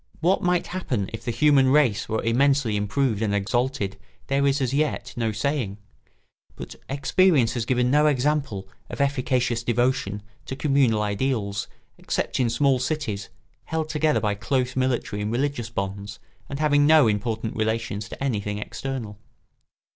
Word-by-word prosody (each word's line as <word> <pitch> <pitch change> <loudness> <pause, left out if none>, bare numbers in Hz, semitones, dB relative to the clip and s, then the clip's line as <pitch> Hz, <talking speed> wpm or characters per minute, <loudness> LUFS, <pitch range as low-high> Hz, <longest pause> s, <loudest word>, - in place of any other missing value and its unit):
What 180 +4 +2
might 180 -1 +1
happen 125 - -3
if 115 - -6
the - - -4
human 135 +3 +4
race 130 -6 +3
were 110 0 -1
immensely 130 0 +2
improved 105 +2 0
and 105 -2 +1
exalted 105 -1 -1 0.3
there 140 +1 +2
is 140 +1 +2
as 130 -1 -1
yet 140 -4 -1
no 115 -2 0
saying; 110 -2 -2 0.8
but - - -8 0.2
experience 140 -1 +3
has 120 -2 -3
given 125 -1 +2
no 150 +2 +4
example 140 -8 0 0.2
of - - -7
efficacious 130 -4 +1
devotion 120 -4 0 0.2
to 135 - -4
communal 135 -7 +2
ideals 105 -2 -1 0.3
except - - -2
in 125 -2 +2
small 130 +2 +2
cities, 125 -7 -3 0.4
held 160 -1 -2
together 155 0 +2
by 105 -1 0
close 130 +4 -1
military 130 -5 -1
and 105 +1 -2
religious 125 -1 -1
bonds 100 -1 -4 0.3
and 140 - -4
having 145 -1 +3
no 155 -5 +6
important 110 +1 -2
relations 110 -1 -2
to - - -7
anything 105 -6 -1
external. 110 -1 -5
125 Hz, 150 wpm, -24 LUFS, 110-140 Hz, 0.8 s, no